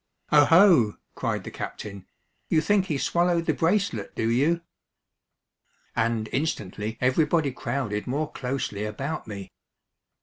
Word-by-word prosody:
"Oho!" 150 - +6 0.2
cried - - -2
the - - -7
captain, 100 -3 -7 0.4
"you 160 - +4
think 195 +3 +2
he 150 - -1
swallowed 170 +3 +1
the - - +2
bracelet, 170 - 0
do 115 +1 0
you?" 155 +8 +2 1.3
And 115 -1 0
instantly 110 - -2
everybody 150 +3 +2
crowded 115 -5 -3
more 150 +4 -2
closely 125 -5 -3
about 135 +9 -4
me. 100 -3 -7
140 Hz, 115 wpm, -26 LUFS, 110-165 Hz, 1.3 s, Oho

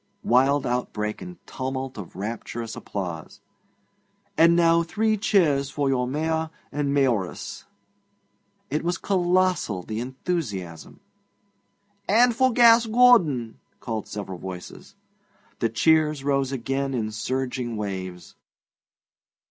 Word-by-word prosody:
(Wild 135 +3 +3
outbreak 105 -3 -2
and 180 -1 -9
tumult 130 0 -4
of 100 -6 -9
rapturous 115 +3 -5
applause.) 85 -5 -6 1.0
And 170 +1 +5
now 170 -1 +4
three 215 +6 0
cheers 160 -10 +2
for 140 0 -1
your 125 -2 +1
Mayor 160 +3 -1 0.2
and 145 -1 -1
Mayoress!' 125 -10 -1 1.1
It 150 - -1
was 175 0 -1
colossal, 185 - +1
the 110 +3 -5
enthusiasm. 120 - -5 1.1
'And 235 +3 +5
for 260 +1 +3
Gas 230 -1 +6
Gordon!' 215 - +4 0.2
called 110 -3 -4
several 95 -3 -6
voices. 90 -1 -9 0.6
The 115 - +1
cheers 155 +3 +2
rose 140 -1 0
again 135 +1 -2
in 110 -3 -2
surging 125 +1 -3
waves. 95 -3 -5
135 Hz, 110 wpm, -24 LUFS, 110-170 Hz, 1.1 s, Gas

